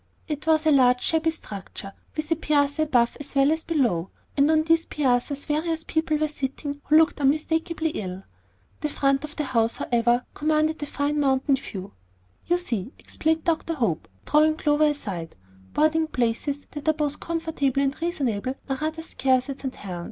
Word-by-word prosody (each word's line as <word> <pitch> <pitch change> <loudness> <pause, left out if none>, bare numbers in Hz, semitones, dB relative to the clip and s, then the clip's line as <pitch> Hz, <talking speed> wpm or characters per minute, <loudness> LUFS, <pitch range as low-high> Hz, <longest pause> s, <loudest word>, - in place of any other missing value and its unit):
It 300 -1 -4
was 315 0 +4
a 310 - +5
large 250 -3 +4
shabby 325 0 +2
structure, 200 - -7 0.2
with 310 +1 -3
a - - +5
piazza 290 -1 +1
above 245 -6 +2
as 290 0 -6
well 275 +2 +5
as 320 0 0
below, 240 - +1 0.3
and 285 +1 +4
on 310 0 +4
these 330 +1 +2
piazzas 275 0 0
various 320 +2 -1
people 315 -1 0
were 310 0 +1
sitting 285 0 -4
who 305 - +5
looked 320 -2 +3
unmistakably 320 +3 +1
ill. 190 -6 -5 0.6
The 300 - -2
front 275 -1 +1
of 305 0 -7
the 300 - -1
house, 230 -4 +1
however, 240 +1 +1
commanded 310 +1 +1
the 290 - -4
fine 290 +1 -1
mountain 270 0 +3
view. 195 -8 -7 0.5
"You 350 - +3
see," 245 - -2
explained 320 0 -1
Dr. 330 0 0
Hope, 220 - -1 0.2
drawing 310 +1 +4
Clover 300 0 +3
aside, 200 - -3 0.4
"boarding 315 +1 +3
places 265 +2 -1
that 295 +1 -2
are - - +5
both 295 -1 -2
comfortable 320 -5 -1
and 275 +3 -2
reasonable 260 - -1
are 270 -1 -1
rather 315 +3 -3
scarce 260 -4 +1
at 270 - -8
St. 265 -2 -5
Helen's. 180 -3 -6
290 Hz, 175 wpm, -25 LUFS, 260-315 Hz, 0.6 s, a